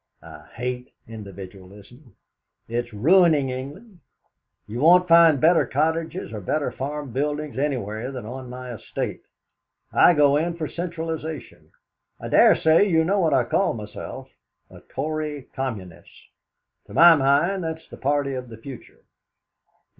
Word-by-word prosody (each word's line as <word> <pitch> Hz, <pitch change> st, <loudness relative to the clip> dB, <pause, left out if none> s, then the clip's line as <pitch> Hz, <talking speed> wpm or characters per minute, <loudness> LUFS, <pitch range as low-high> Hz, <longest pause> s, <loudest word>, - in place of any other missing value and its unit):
I 75 Hz, -2 st, -13 dB
hate 125 Hz, +1 st, -5 dB, 0.2 s
individualism; 100 Hz, -, -12 dB, 0.5 s
it's 120 Hz, +1 st, -3 dB
ruining 150 Hz, -, +3 dB
England. 170 Hz, -, -9 dB, 0.7 s
You 110 Hz, +3 st, -6 dB
won't 180 Hz, +5 st, +5 dB
find 165 Hz, -3 st, +6 dB
better 165 Hz, +5 st, +4 dB
cottages, 160 Hz, +1 st, -2 dB
or 105 Hz, -, -6 dB
better 145 Hz, +10 st, -2 dB
farm 145 Hz, 0 st, -5 dB
buildings 145 Hz, +2 st, -3 dB
anywhere 125 Hz, -4 st, -3 dB
than 125 Hz, -4 st, -7 dB
on 125 Hz, +2 st, -8 dB
my 125 Hz, 0 st, -8 dB
estate. 110 Hz, -, -5 dB, 0.7 s
I 175 Hz, -, +6 dB
go 145 Hz, -1 st, +4 dB
in 170 Hz, +2 st, -1 dB
for 160 Hz, -2 st, -4 dB
centralisation. 160 Hz, -, -6 dB, 0.5 s
I -, -, -7 dB
dare -, -, +6 dB
say 160 Hz, +6 st, +3 dB
you 160 Hz, -2 st, +3 dB
know 200 Hz, +4 st, +1 dB
what 160 Hz, -6 st, +2 dB
I 130 Hz, -, +3 dB
call 115 Hz, -, 0 dB
myself 105 Hz, -2 st, -9 dB, 0.4 s
a -, -, -13 dB
'Tory 150 Hz, -1 st, -5 dB
Communist.' 105 Hz, -10 st, -7 dB, 0.6 s
To -, -, -11 dB
my 170 Hz, 0 st, +8 dB
mind, 150 Hz, +7 st, +1 dB
that's 160 Hz, 0 st, -6 dB
the -, -, -12 dB
party 140 Hz, 0 st, -1 dB
of 125 Hz, -2 st, -6 dB
the 110 Hz, -, -10 dB
future. 125 Hz, +2 st, -12 dB
140 Hz, 140 wpm, -23 LUFS, 120-160 Hz, 0.7 s, my